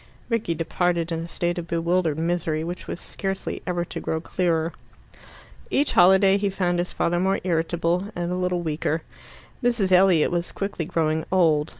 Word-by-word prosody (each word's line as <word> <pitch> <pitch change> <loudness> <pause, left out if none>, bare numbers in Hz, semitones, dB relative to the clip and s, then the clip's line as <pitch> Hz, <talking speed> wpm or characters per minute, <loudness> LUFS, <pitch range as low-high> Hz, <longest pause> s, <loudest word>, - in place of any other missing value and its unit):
Rickie 225 -8 0
departed 170 +1 0
in 165 - -1
a 165 - -5
state 175 +1 -2
of 170 - -7
bewildered 170 -1 0
misery, 165 -1 -1
which 175 +2 -6
was - - -5
scarcely 195 -1 -4
ever 175 -1 -1
to - - -6
grow 160 - -2
clearer. 165 -1 0 1.0
Each 285 +1 +2
holiday 190 +2 +6
he 200 0 0
found 180 -2 0
his 175 - -1
father 175 +1 0
more 190 +2 +1
irritable, 170 +1 0
and 175 0 -2
a - - -1
little 180 -1 -1
weaker. 160 0 -1 0.6
Mrs. 235 -6 +2
Elliot 180 -3 +5
was 175 0 -1
quickly 195 -4 -3
growing 160 0 0
old. 160 -5 +3
175 Hz, 170 wpm, -24 LUFS, 165-185 Hz, 1.0 s, holiday